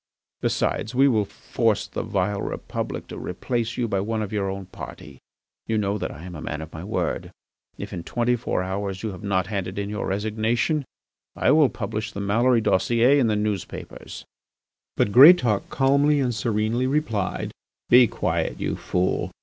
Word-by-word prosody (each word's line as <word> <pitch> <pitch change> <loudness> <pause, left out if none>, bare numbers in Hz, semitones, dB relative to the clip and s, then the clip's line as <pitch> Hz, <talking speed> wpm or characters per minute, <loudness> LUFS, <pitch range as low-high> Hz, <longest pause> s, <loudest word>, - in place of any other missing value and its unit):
Besides, 115 - -1
we 135 +2 +5
will 110 -6 +2
force 110 +1 -1
the - - -4
vile 100 -2 -1
Republic - - -4
to - - -7
replace 120 -2 -3
you 120 - 0
by 100 -3 0
one 110 +2 -1
of 105 - -6
our 100 -2 0
own 95 0 -5
party. 70 -6 -10 0.5
You 110 - 0
know 105 0 0
that - - -3
I 75 - -10
am 90 0 -8
a 75 - -7
man 75 -1 -4
of 80 - -12
my 80 - -7
word. 105 +3 -2 0.5
If - - -7
in 85 - -4
twenty 120 +4 0
four 110 -5 -2
hours 95 +1 -4
you 110 - -2
have 95 - -9
not 100 -3 0
handed 95 -2 -4
in 100 0 -3
your 105 - -3
resignation 110 - 0 0.5
I - - +3
will 150 -2 +5
publish 110 -1 -4
the - - -5
Maloury 115 +4 +3
dossier 120 +7 +3
in 125 - +3
the 110 - +1
newspapers." 105 -2 -4 0.7
But 105 - +2
Greatauk 125 - +7
calmly 140 +2 +3
and 125 -3 0
serenely 110 +3 0
replied: 125 - -1 0.4
"Be 125 0 +8
quiet, - - -2
you - - -2
fool. 90 +1 -1
110 Hz, 175 wpm, -24 LUFS, 100-120 Hz, 0.7 s, Be